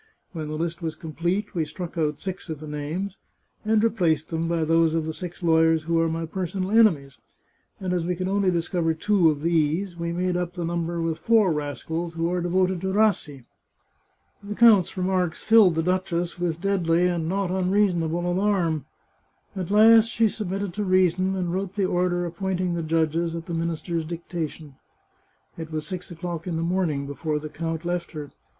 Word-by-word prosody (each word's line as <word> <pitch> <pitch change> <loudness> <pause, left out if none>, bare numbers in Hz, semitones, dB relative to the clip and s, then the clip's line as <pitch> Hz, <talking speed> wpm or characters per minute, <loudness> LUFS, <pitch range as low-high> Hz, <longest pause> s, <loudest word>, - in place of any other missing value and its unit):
When 160 -4 -5
the 155 - -4
list 170 +2 -3
was 160 -2 -3
complete 170 +6 -3
we 165 - 0
struck 175 +2 -7
out 150 -3 -1
six 190 -2 -6
of 155 -2 -4
the 155 - -8
names, 160 +7 -4 0.4
and 215 0 +2
replaced 170 -9 +1
them 165 0 -2
by 165 -1 0
those 165 0 +3
of 160 -1 -2
six 180 -1 -7
lawyers 160 -1 +4
who 165 +1 +1
are 165 0 +2
my 165 +1 -2
personal 185 +3 -3
enemies, 165 - +3 0.6
and 185 -2 -2
as 175 -2 0
we 180 +1 -1
could 185 +1 -3
only 195 0 +2
discover 170 -1 0
two 190 -1 +3
of 145 -2 -2
these, 170 +3 +1
we 170 0 -3
made 180 +1 -1
up 175 -1 -2
the 175 -2 -4
number 170 0 -2
with 165 -1 -2
four 220 -5 +4
rascals 160 +3 -4
who 165 +1 0
are 180 0 0
devoted 185 +1 +1
to 190 0 -1
Rassi." 190 - +1 1.0
The 205 +1 -6
count's 215 -6 +5
remarks 185 -2 0
filled 220 -6 +6
the 165 - +1
duchess 175 -1 -1
with 170 -2 -2
deadly 180 -3 +2
and 170 -2 -1
not 195 -1 -1
unreasonable 180 -3 +1
alarm. 175 -5 +1 0.7
At 185 -3 -4
last 220 +2 +7
she 225 -1 +2
submitted 195 -2 -4
to 210 - -2
reason, 185 0 +2
and 180 -2 -2
wrote 190 +1 -3
the 200 -2 +1
order 175 -1 0
appointing 180 +1 -2
the 170 - -2
judges, 165 +1 0
at 165 -1 -6
the 170 - -5
minister's 165 0 -2
dictation. 160 -3 -6 0.8
It 160 -1 -6
was 155 -1 -3
six 180 +3 -6
o'clock 170 0 -6
in 170 -2 -2
the 165 - -1
morning 170 -5 0
before 150 +2 -3
the 155 +1 -6
count 165 +1 -4
left 175 0 -3
her. 150 -2 -7
175 Hz, 185 wpm, -25 LUFS, 165-185 Hz, 1.0 s, last